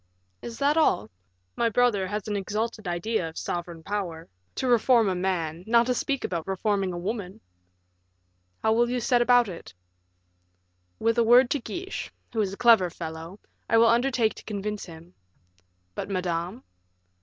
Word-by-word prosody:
"Is 230 -1 -7
that 285 +2 +2
all? 110 - +2 0.4
My 235 - +1
brother 220 -4 +2
has 210 +2 -4
an 210 - -2
exalted 215 +1 -3
idea 175 +1 -1
of 160 - -13
sovereign 170 -1 -5
power. 180 -4 -4 0.3
To 260 - -2
reform 240 -1 +4
a 190 - +1
man, 180 -3 -2
not 235 +1 +4
to 250 - +1
speak 275 +2 -2
about 170 -2 -3
reforming 195 0 0
a 175 - -5
woman!" 190 0 -4 1.2
"How 220 - +3
will 240 +1 +2
you 250 0 -1
set 240 +1 +2
about 245 -1 +5
it?" 170 - -9 1.2
"With 230 +1 +1
a - - +5
word 240 +2 +6
to 290 - +1
Guiche, 365 +9 -6 0.2
who 225 - +1
is 195 -2 -1
a 200 - -8
clever 225 -7 +5
fellow, 165 +3 -8 0.3
I 230 - +4
will 230 - +6
undertake 240 -1 +2
to - - -13
convince 210 0 -4
him." 165 0 -13 0.8
"But 195 - -5
Madame?" 180 +4 -3
210 Hz, 165 wpm, -26 LUFS, 180-235 Hz, 1.2 s, word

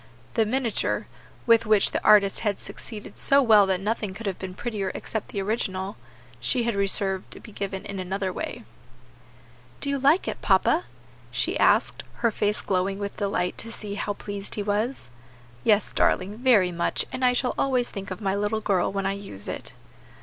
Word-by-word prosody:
The 225 -3 +2
miniature 245 -2 0 0.4
with 230 -1 +5
which 215 -2 +4
the - - -2
artist 200 -2 +6
had 205 -3 -1
succeeded 215 -3 -9
so 280 0 +4
well 215 -4 +6
that 190 -1 +1
nothing 210 -1 -2
could 230 - -7
have 195 -3 -2
been 185 -1 -6
prettier 205 -4 -3
except 220 - -4
the 200 - -3
original 190 -3 -2
herself - - -17 0.4
she 240 - +1
had 235 0 0
reserved 195 -1 0
to - - -7
be 225 - -12
given 195 -1 -4
in 200 -1 -5
another 190 0 -2
way. - - -5 1.2
"Do 280 - -1
you 280 - 0
like 285 +7 +4
it, - - -4
papa?" 335 +3 +3 0.4
she - - 0
asked, - - +3
her 235 - +1
face 210 0 0
glowing 190 +1 0
with 200 0 -5
delight 195 -3 -1
to 230 - -6
see 210 -2 -6
how 205 0 -2
pleased 200 0 -6
he 205 - -2
was. 210 - -2 0.5
"Yes, 210 -2 +3
darling, 200 +3 +1
very 225 -8 +4
much; 170 0 -1
and 255 - -4
I 250 0 +5
shall 250 0 0
always 255 -3 +1
think 195 -1 -6
of 185 +3 -6
my 195 -2 0
little 205 +2 0
girl 195 -4 +1
when 195 0 -2
I 195 - +1
use 195 - -5
it." - - -6
205 Hz, 190 wpm, -26 LUFS, 195-230 Hz, 1.2 s, artist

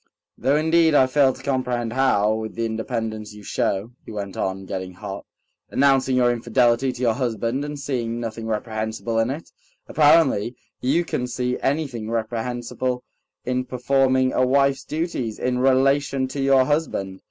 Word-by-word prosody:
"Though 135 +2 +1
indeed 160 0 +3
I 130 - +6
fail 135 +1 +3
to - - -12
comprehend 125 -4 -1
how, 110 -5 +3
with 110 0 -4
the 115 - -1
independence 110 -1 -4
you 105 - -12
show," 100 +3 -1
he - - -10
went 100 -2 -5
on, 95 0 -3
getting 95 -1 -5
hot, 100 +1 -7 0.4
"—announcing 135 -1 +3
your 125 -1 +4
infidelity 120 +2 +2
to 125 0 -9
your 115 -2 +3
husband 120 +1 -1
and 145 0 -5
seeing 120 -4 -2
nothing 115 -1 -5
reprehensible 110 +1 -2
in 115 +2 +1
it, 150 +5 -6 0.3
apparently—you 145 0 +2
can 125 -6 -2
see 125 0 -2
anything 135 -6 -2
reprehensible 120 +2 -2 0.4
in 125 0 0
performing 130 0 +1
a 130 - +2
wife's 135 +1 +2
duties 150 -8 -3
in 125 0 -1
relation 135 +1 +2
to 140 - -4
your 135 -1 +4
husband." 115 -11 -1
125 Hz, 155 wpm, -23 LUFS, 110-135 Hz, 0.4 s, I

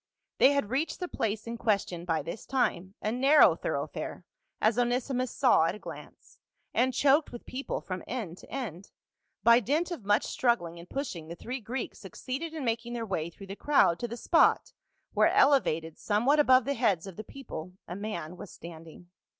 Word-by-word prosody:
They 275 - +7
had 280 -7 -1
reached 285 +5 -1
the 360 - -3
place 220 -8 -2
in 230 0 -6
question 195 -6 0
by 165 -3 0
this 190 - -7
time, 195 -7 0
a 215 - 0
narrow 275 +5 +6
thoroughfare, - - -4 0.3
as 220 +2 +2
Onesimus 250 +1 0
saw 245 -12 +4
at 170 +3 -1
a - - -8
glance, - - -11 0.3
and 255 +1 +2
choked 285 +3 +3
with 240 - -9
people 265 +2 -4
from 185 -1 -5
end 205 -9 -5
to - - -15
end. 200 - -6 0.5
By 235 +1 +7
dint 300 - 0
of 330 -11 -5
much 205 +1 +2
struggling 175 -9 0
and 170 - -12
pushing 215 - -4
the 170 - -7
three 250 +8 -6
Greeks 240 +3 -5
suc 190 -4 -11
ceeded 305 +6 -4
in 310 -4 -4
making 230 +1 -2
their 235 -1 -3
way 170 -5 -2
through 195 +3 -12
the 195 +1 -7
crowd 205 - +3
to 240 - -2
the 235 +1 -6
spot 330 +6 +3 0.4
where, - - +5
elevated 165 - +3
somewhat 240 +8 +2
above 255 -4 +5
the 280 - 0
heads 210 -9 +1
of 190 -3 -9
the 215 - -7
people, 185 -9 -8
a 175 - -5
man 200 -5 -5
was 190 - -9
standing. 165 +1 -12
230 Hz, 190 wpm, -29 LUFS, 180-265 Hz, 0.5 s, They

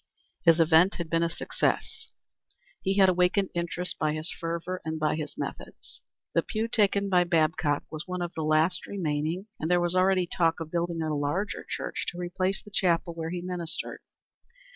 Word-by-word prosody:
His 165 -1 +5
advent 165 +4 +5
had 170 -2 -5
been 165 0 +3
a 170 - +2
success. 165 - -2 0.7
He 195 +1 0
had 195 -1 +7
awakened 180 +2 +2
interest 175 +1 -3
by 155 -1 +1
his 155 +2 -4
fervor 170 +2 -4
and 160 0 -3
by 155 0 +1
his 155 -1 -5
methods. - - -7 0.3
The - - +4
pew 220 +1 -2
taken 200 -3 +2
by 180 -2 +4
Babcock 160 -3 +1
was 155 +2 -6
one 180 -1 -2
of 175 - -5
the 160 - -4
last 155 +4 +2
remaining, 165 0 -2
and 160 - -2
there 180 0 +4
was 175 0 +1
already 185 0 +3
talk 165 -1 +1
of 160 -1 -6
building 170 -1 -1
a 155 -1 -1
larger 150 +8 -1
church - - -3
to 175 - -4
replace 185 +2 -1
the 210 - -14
chapel 175 -3 +1
where 165 -1 -4
he 175 +1 -3
ministered. 170 -3 -4
170 Hz, 185 wpm, -28 LUFS, 160-185 Hz, 0.7 s, had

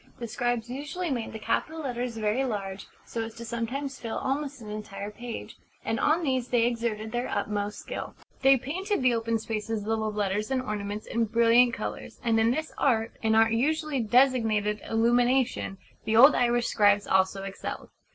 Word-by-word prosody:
The 235 - -5
scribes 240 0 -1
usually 295 +7 -4
made 240 -4 -2
the - - -6
capital 315 +8 -2
letters 245 -4 -3
very 215 +4 +1
large, 195 -5 -4 0.2
so 230 - -4
as 225 +1 -7
sometimes 250 +5 -3
to - - -19
fill 230 -2 -3
almost 280 +1 -2
an 215 -2 -8
entire 210 -1 -6
page; 240 +2 -7 0.3
and 225 -1 -1
on 325 +3 +2
these 260 -4 0
they 240 -2 +2
exerted 230 -2 -2
their 245 +1 -1
utmost 205 0 -2
skill. - - -6 0.3
They 270 0 +6
painted 345 - -2
the 250 -1 +4
open 230 0 0
spaces 220 0 -3
of - - -8
the 225 +1 +1
letters 210 -1 -1
and 265 -1 +1
ornaments 210 -2 -4
in 230 0 0
brilliant 235 +2 +4
colours: - - -6
and 225 -2 +2
in 225 +1 +4
this 310 +6 -2
art 225 -4 +2
an 220 -1 +2
art 225 0 +5
usually 305 +3 0
designated 225 -3 +2
'Illumination' 240 -1 +2 0.3
the 220 - 0
old 270 +6 +9
Irish 240 -1 +2
scribes 205 -1 +3
also 190 +1 +2
excelled. 195 0 -6
230 Hz, 180 wpm, -27 LUFS, 215-255 Hz, 0.3 s, old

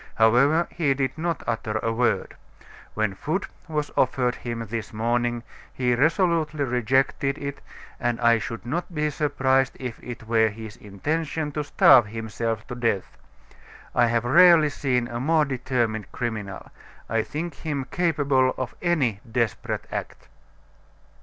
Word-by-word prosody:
However, 135 +9 +4
he 150 -6 +1
did 130 -1 -1
not 165 0 -2
utter 115 -2 -2
a 115 +1 -1
word. 115 -5 0 0.6
When 110 -2 0
food 155 - -2 0.2
was 150 -2 -2
offered 125 -1 +2
him 115 -2 -5
this 110 -1 -5
morning, 120 +2 0 0.3
he 125 -1 0
resolutely 155 +1 +2
rejected 130 +2 +1
it, 140 -1 -6 0.4
and 120 -1 -1
I 120 -1 +4
should 115 +2 -6
not 170 +7 -3
be 150 0 0
surprised 135 -3 +1
if 125 -3 -6
it 120 -1 -7
were 110 0 +3
his 110 0 -9
intention 150 +9 -3
to 150 +1 -2
starve 125 -4 +6
himself 115 0 -3
to - - -4
death. 115 -6 -1 0.8
I 120 -1 +4
have 115 0 0
rarely 170 +2 +7
seen 125 -4 0
a 120 0 -5
more 155 +3 +3
determined 120 -5 -2
criminal. 110 -5 -5 0.4
I 115 0 +1
think 160 +7 -5
him 145 -4 -3
capable 140 -7 +2
of 130 - -4
any 140 - +1
desperate 115 -2 -1
act." - - -6
125 Hz, 140 wpm, -25 LUFS, 115-150 Hz, 0.8 s, rarely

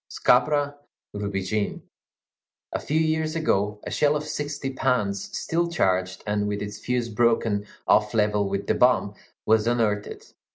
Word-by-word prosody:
Scabra 145 -1 +2 0.4
rubigine. 100 0 -2 0.9
A - - -2
few 155 +2 0
years 160 0 0
ago, 105 -10 0
a - - -6
shell 150 0 +2
of 150 - -2
sixty 145 -2 -4
pounds, 115 -7 -1
still 170 +1 0
charged, 95 - 0
and 105 0 0
with 105 0 -2
its 105 0 -7
fuse 125 -1 -1
broken 115 -2 +1 0.2
off 105 +1 +3
level 105 -2 +2
with 100 0 -2
the - - +2
bomb, 125 -5 +3 0.3
was 110 0 +3
unearthed. 110 -4 -1
110 Hz, 140 wpm, -25 LUFS, 105-145 Hz, 0.9 s, off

